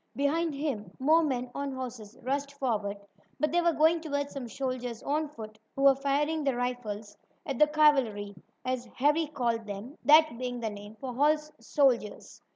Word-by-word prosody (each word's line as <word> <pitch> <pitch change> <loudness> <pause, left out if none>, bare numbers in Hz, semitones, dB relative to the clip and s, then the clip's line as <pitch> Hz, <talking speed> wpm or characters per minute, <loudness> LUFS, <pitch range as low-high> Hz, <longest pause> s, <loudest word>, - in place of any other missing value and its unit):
Behind 305 +3 +1
him 275 - -3
more 310 +5 +4
men 250 -4 -2
on 280 -1 -3
horses 240 -4 -7
rushed 280 +2 -2
forward, 215 -7 -1 0.4
but 305 +1 +1
they 345 +1 +3
were 340 0 +3
going 320 +1 +3
toward 285 -2 -2
some 270 -3 -6
soldiers 250 -1 -4
on 300 +2 0
foot, 215 -6 -10 0.2
who 275 - -1
were 275 -1 +8
firing 285 +3 0
their 275 -3 +1
rifles 225 -4 -4 0.3
at 275 -4 -3
the 300 - +7
"cavalry," 270 -10 +3 0.3
as 255 -1 -1
Harry 300 +4 +2
called 235 -6 -1
them, 205 +8 -7
that 305 -4 +6
being 250 -1 -3
the 225 -2 -2
name 205 +1 -10
for 255 +2 -6
horse 300 +3 +2
soldiers. 235 -3 0
270 Hz, 170 wpm, -29 LUFS, 235-295 Hz, 0.4 s, were